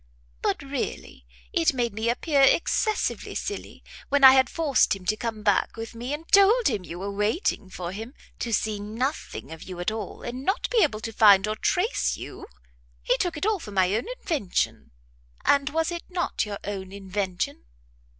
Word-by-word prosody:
But -, -, -1 dB
really -, -, -5 dB, 0.3 s
it 165 Hz, -, +2 dB
made 240 Hz, -3 st, 0 dB
me 220 Hz, +2 st, -1 dB
appear 280 Hz, +4 st, +1 dB
excessively 385 Hz, -, +2 dB
silly, 410 Hz, -, -5 dB, 0.3 s
when 285 Hz, 0 st, +2 dB
I 265 Hz, -, +12 dB
had 260 Hz, -1 st, +4 dB
forced 300 Hz, -10 st, +2 dB
him 190 Hz, -2 st, -12 dB
to 215 Hz, -, +2 dB
come 220 Hz, -1 st, -4 dB
back 205 Hz, +1 st, +1 dB
with 225 Hz, 0 st, -6 dB
me, 240 Hz, +3 st, -5 dB
and 310 Hz, +3 st, -5 dB
told 420 Hz, +5 st, +6 dB
him 215 Hz, -7 st, 0 dB
you 175 Hz, -1 st, -8 dB
were 195 Hz, +2 st, -4 dB
waiting 210 Hz, -, -1 dB
for 180 Hz, -2 st, -5 dB
him, 225 Hz, +7 st, -7 dB, 0.2 s
to 235 Hz, -, -3 dB
see 215 Hz, -1 st, 0 dB
nothing 225 Hz, -, -4 dB
of 160 Hz, 0 st, -9 dB
you 185 Hz, -1 st, -8 dB
at 175 Hz, +4 st, 0 dB
all, 215 Hz, -3 st, -6 dB
and 250 Hz, +2 st, -5 dB
not 385 Hz, -, 0 dB
be 470 Hz, -3 st, +4 dB
able 225 Hz, -, +1 dB
to 225 Hz, +1 st, -5 dB
find 205 Hz, -2 st, +6 dB
or 215 Hz, -, -1 dB
trace 365 Hz, -, 0 dB
you. -, -, -9 dB, 0.6 s
He -, -, +3 dB
took 350 Hz, -3 st, -1 dB
it 300 Hz, -, -2 dB
all 430 Hz, -2 st, +1 dB
for 225 Hz, -, -9 dB
my 190 Hz, -1 st, +2 dB
own 220 Hz, -, 0 dB, 0.2 s
invention." 270 Hz, -, -1 dB, 0.6 s
"And 280 Hz, 0 st, +3 dB
was 325 Hz, +2 st, 0 dB
it 345 Hz, 0 st, -6 dB
not 350 Hz, -, -1 dB
your 205 Hz, -1 st, -4 dB
own 190 Hz, -2 st, -5 dB
invention?" 190 Hz, -, -3 dB
225 Hz, 190 wpm, -26 LUFS, 200-295 Hz, 0.6 s, I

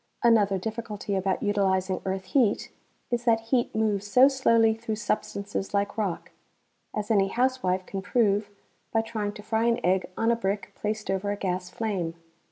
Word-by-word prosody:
Another 210 Hz, -4 st, +4 dB
difficulty 215 Hz, 0 st, -4 dB
about 190 Hz, +6 st, 0 dB
utilizing 190 Hz, -2 st, +1 dB
earth 190 Hz, 0 st, -2 dB
heat 220 Hz, +1 st, +1 dB, 0.4 s
is 240 Hz, 0 st, 0 dB
that 230 Hz, -2 st, +4 dB
heat 235 Hz, +1 st, 0 dB
moves 210 Hz, -2 st, 0 dB
so 250 Hz, +6 st, +7 dB
slowly 230 Hz, -5 st, +4 dB
through 220 Hz, 0 st, -4 dB
substances 200 Hz, -2 st, -3 dB
like 200 Hz, 0 st, 0 dB
rock, 200 Hz, -6 st, -3 dB, 0.6 s
as 210 Hz, +1 st, -2 dB
any 195 Hz, -3 st, +4 dB
housewife 235 Hz, -6 st, 0 dB
can 195 Hz, 0 st, -5 dB
prove 205 Hz, -1 st, +1 dB, 0.4 s
by 225 Hz, -, +2 dB
trying 215 Hz, -2 st, -3 dB
to 210 Hz, -, -10 dB
fry 220 Hz, +1 st, 0 dB
an 235 Hz, 0 st, +2 dB
egg 185 Hz, +1 st, +2 dB
on 225 Hz, +1 st, +2 dB
a -, -, +3 dB
brick 200 Hz, -2 st, -3 dB
placed 215 Hz, -1 st, -3 dB
over 195 Hz, +1 st, -1 dB
a 205 Hz, -, -1 dB
gas 180 Hz, -2 st, -2 dB
flame. 190 Hz, -7 st, -2 dB
210 Hz, 170 wpm, -27 LUFS, 195-225 Hz, 0.6 s, so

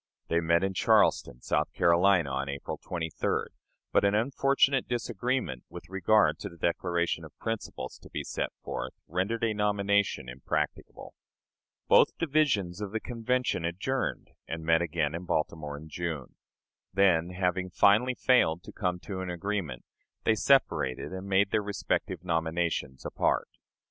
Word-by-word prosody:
They 85 Hz, -, +3 dB
met 85 Hz, +1 st, +2 dB
in 95 Hz, 0 st, 0 dB
Charleston, 60 Hz, -8 st, +3 dB
South -, -, 0 dB
Carolina, 85 Hz, -3 st, +4 dB
on 70 Hz, +1 st, -2 dB
April 70 Hz, 0 st, -5 dB
23d, 80 Hz, -2 st, -2 dB, 0.4 s
but -, -, +3 dB
an 100 Hz, +1 st, +3 dB
unfortunate 135 Hz, +3 st, +2 dB
disagreement 120 Hz, -, -2 dB
with 85 Hz, 0 st, -10 dB
regard 95 Hz, +3 st, +3 dB
to -, -, -5 dB
the 85 Hz, -, -15 dB
declaration 85 Hz, +1 st, 0 dB
of -, -, -13 dB
principles 115 Hz, -1 st, -5 dB
to -, -, -15 dB
be -, -, -4 dB
set -, -, -3 dB
forth 60 Hz, +2 st, -4 dB
rendered 100 Hz, +8 st, -1 dB
a 115 Hz, -1 st, +2 dB
nomination 100 Hz, -5 st, +1 dB
impracticable. 65 Hz, +2 st, -4 dB, 0.7 s
Both -, -, +5 dB
divisions 135 Hz, -, +1 dB
of 105 Hz, 0 st, -5 dB
the 110 Hz, -, 0 dB
Convention 125 Hz, -3 st, -1 dB
adjourned, 100 Hz, +11 st, -2 dB, 0.2 s
and 80 Hz, 0 st, -5 dB
met 80 Hz, 0 st, +4 dB
again 80 Hz, -3 st, -1 dB
in 85 Hz, +2 st, -5 dB
Baltimore 75 Hz, -3 st, -2 dB
in 80 Hz, +2 st, -11 dB
June. 80 Hz, -4 st, -4 dB, 0.6 s
Then, 90 Hz, -3 st, +3 dB
having 90 Hz, 0 st, 0 dB
finally 105 Hz, +8 st, +4 dB
failed 85 Hz, -12 st, +3 dB
to -, -, -10 dB
come 90 Hz, -3 st, -1 dB
to 95 Hz, -2 st, -5 dB
an 95 Hz, -, -4 dB
agreement, 90 Hz, -7 st, -3 dB, 0.4 s
they 110 Hz, -, +4 dB
separated 90 Hz, -, +2 dB
and 95 Hz, +1 st, -6 dB
made 100 Hz, +1 st, +3 dB
their 110 Hz, -, +2 dB
respective 100 Hz, -3 st, -2 dB
nominations 80 Hz, -5 st, -1 dB
apart. -, -, 0 dB
90 Hz, 145 wpm, -29 LUFS, 80-105 Hz, 0.7 s, Both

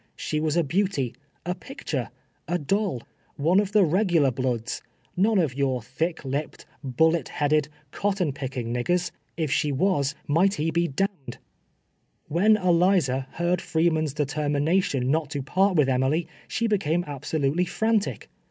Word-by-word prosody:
She 155 Hz, -, -2 dB
was 155 Hz, +1 st, 0 dB
a 170 Hz, -, +4 dB
beauty 155 Hz, -, 0 dB, 0.2 s
— -, -, -42 dB
a 180 Hz, -, 0 dB
picture 265 Hz, +8 st, -5 dB, 0.2 s
— -, -, -43 dB
a 175 Hz, -, 0 dB
doll 180 Hz, -, -1 dB, 0.2 s
— -, -, -37 dB
one 180 Hz, +3 st, +5 dB
of 205 Hz, -1 st, -1 dB
the 205 Hz, -2 st, +5 dB
regular 170 Hz, -5 st, +3 dB
bloods 125 Hz, -2 st, -2 dB, 0.2 s
— -, -, -40 dB
none 210 Hz, +4 st, +3 dB
of 160 Hz, -8 st, +2 dB
your 135 Hz, -2 st, 0 dB
thick 160 Hz, +6 st, -3 dB
lipped, 140 Hz, +3 st, -4 dB, 0.2 s
bullet 160 Hz, +6 st, +2 dB
headed, 150 Hz, 0 st, +1 dB, 0.2 s
cotton 195 Hz, -7 st, 0 dB
picking 130 Hz, -4 st, -4 dB
niggers 175 Hz, +8 st, 0 dB
— -, -, -44 dB
if 155 Hz, -5 st, -1 dB
she 150 Hz, 0 st, +1 dB
was 145 Hz, -2 st, +1 dB
might 185 Hz, +7 st, +3 dB
he 160 Hz, +2 st, -1 dB
be 170 Hz, +1 st, +1 dB
d— 155 Hz, +7 st, +1 dB, 0.2 s
d. -, -, -8 dB, 0.9 s
"WHien 210 Hz, +7 st, +4 dB
Eliza 170 Hz, -7 st, +3 dB
heard 175 Hz, +1 st, 0 dB
Freeman's 160 Hz, -3 st, +1 dB
determination 145 Hz, -1 st, 0 dB
not 155 Hz, -1 st, 0 dB
to 145 Hz, -2 st, -3 dB
part 190 Hz, +6 st, +2 dB
with 150 Hz, -4 st, +4 dB
Emily, 135 Hz, +6 st, +1 dB, 0.2 s
she 230 Hz, -, -1 dB
became 175 Hz, -6 st, +1 dB
absolutely 145 Hz, +3 st, -1 dB
frantic. 220 Hz, +3 st, 0 dB
160 Hz, 160 wpm, -25 LUFS, 140-180 Hz, 0.9 s, one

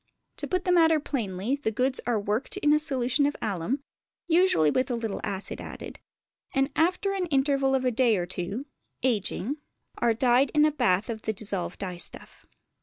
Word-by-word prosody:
To -, -, -2 dB
put 365 Hz, 0 st, -1 dB
the 360 Hz, -, +2 dB
matter 325 Hz, -3 st, +5 dB
plainly, 230 Hz, -3 st, -2 dB
the 280 Hz, -, -1 dB
goods 255 Hz, +4 st, 0 dB
are 235 Hz, -3 st, +2 dB
worked 210 Hz, +5 st, -2 dB
in 295 Hz, 0 st, +3 dB
a 300 Hz, -, +4 dB
solution 275 Hz, -2 st, +2 dB
of 290 Hz, -, -2 dB
alum 215 Hz, -, -2 dB, 0.4 s
(usually 335 Hz, -, +4 dB
with 255 Hz, -, 0 dB
a 245 Hz, -, 0 dB
little 225 Hz, -3 st, -3 dB
acid 200 Hz, -1 st, -4 dB
added), -, -, -8 dB, 0.6 s
and 270 Hz, +1 st, +2 dB
after 365 Hz, +4 st, +1 dB
an 375 Hz, -2 st, -1 dB
interval 275 Hz, -2 st, +2 dB
of 260 Hz, -1 st, 0 dB
a 250 Hz, -, +3 dB
day 235 Hz, -3 st, +3 dB
or 175 Hz, -, -1 dB
two 185 Hz, +8 st, -4 dB, 0.4 s
(ageing) 245 Hz, +2 st, 0 dB, 0.4 s
are 235 Hz, -2 st, +2 dB
dyed 250 Hz, +3 st, +3 dB
in 300 Hz, 0 st, +6 dB
a 305 Hz, -, +3 dB
bath 190 Hz, -8 st, +1 dB
of 225 Hz, -2 st, -5 dB
the 220 Hz, -, -2 dB
dissolved 200 Hz, -3 st, -2 dB
dye 180 Hz, -3 st, -5 dB
stuff. 175 Hz, -, -3 dB
255 Hz, 185 wpm, -27 LUFS, 210-290 Hz, 0.6 s, in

